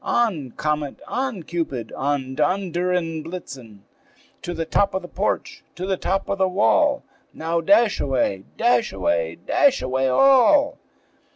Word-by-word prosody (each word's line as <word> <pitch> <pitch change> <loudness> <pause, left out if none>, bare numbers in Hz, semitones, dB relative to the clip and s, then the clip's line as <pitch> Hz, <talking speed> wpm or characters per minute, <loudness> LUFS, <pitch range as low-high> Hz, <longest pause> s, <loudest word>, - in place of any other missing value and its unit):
On, 190 - 0
Comet! 150 -2 -2
on, 250 -8 -3
Cupid, 145 -9 -4
on, 135 -1 -2
Donder 180 +4 0
and 165 -3 -2
Blitzen! 135 - -9 0.6
To 175 - -5
the 165 - -3
top 195 +4 +1
of 190 - -2
the - - -8
porch, 195 +3 -3
to 180 - -5
the 190 0 0
top 195 +1 -2
of 200 - -2
the 190 - +3
wall! 285 +9 +2 0.3
Now 165 +1 -1
dash 205 +6 +3
away, 125 -8 -1
dash 235 -1 +2
away, 85 -3 -1
dash 285 -2 +3
away 130 +1 0
all!" 275 - +4
175 Hz, 150 wpm, -22 LUFS, 140-200 Hz, 0.6 s, all